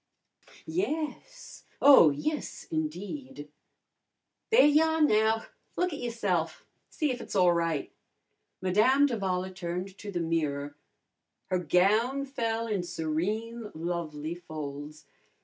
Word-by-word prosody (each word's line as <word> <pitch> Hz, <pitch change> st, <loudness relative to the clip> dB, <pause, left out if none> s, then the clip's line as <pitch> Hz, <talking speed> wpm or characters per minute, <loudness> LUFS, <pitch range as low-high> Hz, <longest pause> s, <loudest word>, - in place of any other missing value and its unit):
"Yes! 330 Hz, +8 st, -4 dB, 0.2 s
Oh, 275 Hz, -, +8 dB
yes, 295 Hz, -, -3 dB
indeed!" 165 Hz, -, -5 dB, 1.0 s
"There 455 Hz, -5 st, +6 dB
y'ah 320 Hz, +2 st, +4 dB
now! 220 Hz, -6 st, +3 dB, 0.3 s
Look 360 Hz, -2 st, 0 dB
at 290 Hz, -, -5 dB
youse'f! 200 Hz, -9 st, -2 dB, 0.2 s
See 300 Hz, -3 st, -1 dB
if 245 Hz, -1 st, -4 dB
it's -, -, -7 dB
a'right." 170 Hz, -5 st, +2 dB, 0.7 s
Madame 220 Hz, +10 st, +4 dB
d'Avala 190 Hz, -7 st, -1 dB
turned 180 Hz, +2 st, -4 dB
to 205 Hz, -, -7 dB
the 175 Hz, -, -2 dB
mirror. 145 Hz, -4 st, -1 dB, 0.8 s
Her 185 Hz, -, +2 dB
gown 215 Hz, -, +2 dB
fell 230 Hz, -4 st, -2 dB
in 210 Hz, -4 st, -1 dB
serene, 180 Hz, +7 st, -3 dB
lovely 160 Hz, -2 st, -3 dB
folds. 150 Hz, -3 st, -8 dB
190 Hz, 105 wpm, -29 LUFS, 165-260 Hz, 1.0 s, Oh